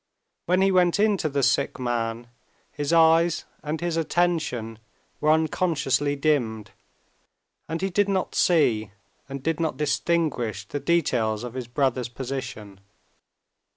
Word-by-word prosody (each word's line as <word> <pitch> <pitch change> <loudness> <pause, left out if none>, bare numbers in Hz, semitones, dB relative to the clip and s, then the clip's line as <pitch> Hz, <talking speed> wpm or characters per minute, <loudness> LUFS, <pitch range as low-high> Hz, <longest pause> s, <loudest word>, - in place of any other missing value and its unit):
When 180 +2 +3
he 195 - +3
went 180 0 +3
in 210 0 +4
to 155 - -1
the 140 -1 -1
sick 140 - +1
man, 120 -1 -2 0.4
his 145 +1 -3
eyes 165 0 +4 0.2
and 155 +1 -3
his 170 -1 -2
attention 155 -10 -1 0.4
were 150 - +1
unconsciously 155 -3 +1
dimmed, 125 -8 0 1.0
and 165 +3 -3
he 195 - 0
did 205 +2 +2
not 190 -2 -1
see 120 - +2 0.4
and 135 -1 -6
did 165 +1 -1
not 160 -5 -1
distinguish 140 - -1
the 145 - -4
details 120 -10 0
of 120 -2 -6
his 125 -2 -5
brother's 125 -1 0
position. 120 -6 -6
145 Hz, 135 wpm, -25 LUFS, 120-170 Hz, 1.0 s, in